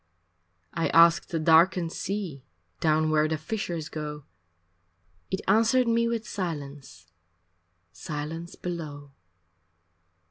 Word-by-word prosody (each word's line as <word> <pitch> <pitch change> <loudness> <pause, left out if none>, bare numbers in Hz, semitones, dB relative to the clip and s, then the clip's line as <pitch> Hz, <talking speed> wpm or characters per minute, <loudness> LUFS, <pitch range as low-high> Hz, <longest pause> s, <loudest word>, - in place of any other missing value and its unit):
I 165 - 0
asked 170 0 +5
the 165 - -2
darkened 165 +2 +4
sea 185 -11 -4 0.4
Down 155 0 +2
where 155 0 +3
the 160 0 -1
fishers 170 -2 -4
go 150 -2 -6 1.1
It 190 - -2
answered 230 +5 +4
me 235 0 +2
with 230 -1 -2
silence, 145 - -6 0.9
Silence 155 - -6
below. 150 -5 -6
165 Hz, 100 wpm, -27 LUFS, 150-190 Hz, 1.1 s, asked